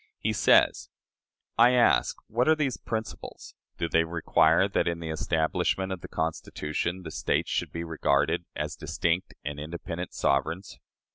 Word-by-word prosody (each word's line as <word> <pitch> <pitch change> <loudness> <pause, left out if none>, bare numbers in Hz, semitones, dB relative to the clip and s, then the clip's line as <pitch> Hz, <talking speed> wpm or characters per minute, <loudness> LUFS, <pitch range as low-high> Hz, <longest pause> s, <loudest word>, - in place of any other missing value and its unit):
He - - -1
says: - - +4 0.7
"I 120 +2 +7
ask, 125 -1 +3
What 120 +5 0
are 160 - +6
these 145 -5 0
principles? 110 -2 -6 0.2
Do 85 - -1
they 80 0 +3
require 80 +1 +3
that, 95 - 0
in 85 -1 -1
the 80 -1 -4
establishment 85 +4 0
of 95 -2 -4
the - - -8
Constitution, 80 +2 -3
the 80 - -7
States - - -1
should - - -1
be 85 - -4
regarded 80 -4 +1
as 75 0 -3
distinct 85 +2 -1
and 75 0 -4
independent 85 +3 -6
sovereigns? 80 +7 -1
85 Hz, 150 wpm, -27 LUFS, 80-95 Hz, 0.7 s, I